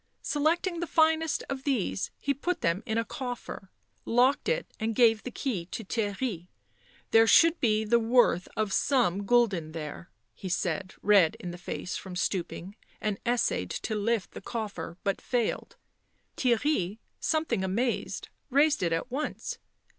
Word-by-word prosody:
Selecting 335 +4 +1
the 345 - -2
finest 320 0 +2
of 270 -1 -4
these 250 -9 -1
he 280 - 0
put 350 +6 -2
them 170 +4 +1
in 220 0 0
a 230 - +1
coffer, 245 -7 -6 0.3
locked 255 - +3
it - - 0
and 220 0 -1
gave 225 -2 +5
the - - -5
key 225 -10 -3
to 225 - -5
Theirry. 205 -3 -2 0.3
" - - -31
There 225 0 +6
should 330 +6 +6
be 220 -2 +2
the 235 +2 +4
worth 230 -6 +3
of 215 -2 0
some 205 -8 +2
gulden 195 -10 +2
there," 160 +1 -6 0.2
he 185 - -7
said, 185 +1 -2
red 195 -6 +5
in 175 - -5
the 175 - -8
face 180 0 -4
from 190 -2 -8
stooping, 185 +1 -3 0.2
and 210 -2 -2
essayed 235 - +1
to 220 - -3
lift 215 0 0
the - - -9
coffer, 210 -5 -5
but 195 -1 -1
failed. 240 -3 -1 0.6
Theirry, 235 - +1 0.2
something 310 -11 0
amazed, 230 +6 -1 0.2
raised 290 +3 +3
it 170 -2 +1
at 165 +10 -2
once. 285 +4 -3
225 Hz, 155 wpm, -29 LUFS, 190-265 Hz, 0.6 s, There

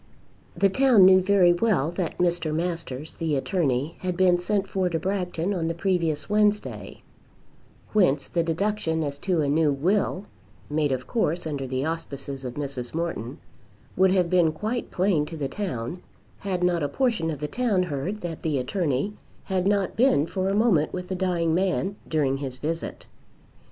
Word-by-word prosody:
The 200 - +4
town 240 -2 +5
knew 185 0 +7
very 185 -2 +5
well 175 -6 +1
that 175 -1 -3
Mr. 175 -3 +1
Masters, 165 -4 -3
the 160 -3 -1
attorney, 140 -2 -1
had 180 -1 -3
been 180 -2 +4
sent 200 +2 0
for 190 -2 0
to 165 - -1
Bragton 180 0 -2
on 170 -4 -1
the 165 - -2
previous 170 -4 0
Wednesday, 210 0 0 0.9
whence 175 -10 +3
the 170 - 0
deduction 165 -1 -1
as 140 -1 -4
to 180 -2 0
a 145 - 0
new 150 +1 +3
will, 185 +6 0 0.5
made 150 -1 +1
of 130 -1 -2
course 175 - -1
under 140 -4 -3
the 130 +2 -2
auspices 140 -4 -5
of 125 -1 -5
Mrs. 140 -3 -5
Morton, 165 -6 -3 0.6
would 190 +1 +4
have 185 -2 +3
been 170 -2 +3
quite 220 +8 -3
plain 180 -4 +1
to 165 - -7
the 140 -3 -2
town, 170 - -4 0.4
had 185 -3 -2
not 175 -2 +2
a 145 - 0
portion 225 - 0
of 150 -3 -4
the 150 - -3
town 215 -3 +1
heard 175 +6 -3
that 165 -2 -5
the 155 -4 0
attorney 145 +5 -1 0.3
had 190 -1 -1
not 200 -2 +1
been 230 - +4
for 190 +3 -2
a 195 - 0
moment 205 -9 +3
with 180 -1 -6
the 190 - -2
dying 175 -3 0
man 190 +2 0
during 140 -4 +1
his 135 -2 -5
visit. 165 +4 -4
175 Hz, 175 wpm, -25 LUFS, 150-190 Hz, 0.9 s, knew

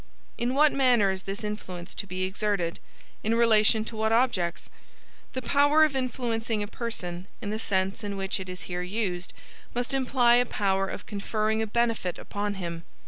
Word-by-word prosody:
In 245 +2 -1
what 300 +1 +6
manner 245 -7 +4
is 190 0 -4
this 195 +3 -6
influence 185 -4 -5
to 200 - -5
be 185 0 -3
exerted? 190 -3 -1 0.4
In 225 +2 +2
relation 220 -1 +4
to 225 - -7
what 220 0 +1
objects? 225 -8 +1 0.7
The 260 - -3
power 290 +4 +5
of 305 -3 +2
influencing 230 -4 -1
a - - -4
person, 185 -6 -5
in 210 -4 -4
the 215 - -2
sense 195 -1 0
in 200 -1 -3
which 195 0 -1
it 185 -1 -6
is 180 0 -6
here 180 -1 -4
used, 180 -2 -2 0.4
must 245 +2 -1
imply 250 -2 +4
a 245 - +4
power 195 -2 +1
of - - -6
conferring 215 +1 -1
a 220 - -1
benefit 225 -5 0
upon 205 0 -3
him. 170 -3 -5
215 Hz, 180 wpm, -27 LUFS, 190-235 Hz, 0.7 s, what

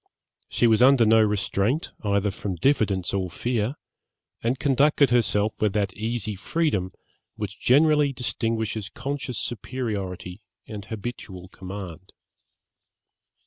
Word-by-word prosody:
She - - +1
was 115 0 +4
under 130 -2 +6
no 110 +1 +6
restraint, 105 - 0
either 100 0 +1
from 95 -1 -4
diffidence 100 - +1
or 95 -2 -1
fear, 120 - -1 0.7
and 120 +3 0
conducted 140 0 +3
herself 110 -3 +1
with 105 -2 +2
that 100 -3 0
easy 110 +1 -3
freedom 100 - -1 0.4
which - - -6
generally 150 +2 +4
distinguishes 115 -4 -2
conscious 140 -3 -4
superiority 100 -6 -4 0.2
and 105 -2 -8
habitual 105 -5 -7
command. 95 -2 -9
110 Hz, 110 wpm, -25 LUFS, 100-125 Hz, 0.7 s, under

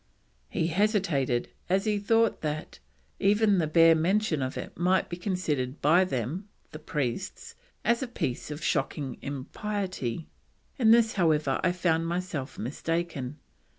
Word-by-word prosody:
He 160 - 0
hesitated, 170 - +1 0.2
as 190 +3 +2
he 210 -1 +1
thought 225 +2 +2
that: 155 0 -4 0.4
"even 205 0 +4
the 160 - +1
bare 165 +1 +6
mention 170 0 +1
of 130 0 -3
it - - -6
might 185 +2 +2
be 175 - -3
considered 160 -8 -2
by 170 +6 +5
them 155 - -3 0.2
[the 155 - -8
priests] 150 +3 -3 0.3
as 235 +2 +3
a 265 - -2
piece 155 - -3
of 150 +1 -6
shocking 135 -5 -1
impiety. 165 - -4 0.5
In 225 -3 +5
this, 225 -1 +5
however, 155 -7 +2
I 180 - +3
found 165 -2 +1
myself 170 -5 -3
mistaken. 150 +1 -3
170 Hz, 140 wpm, -28 LUFS, 145-195 Hz, 0.5 s, bare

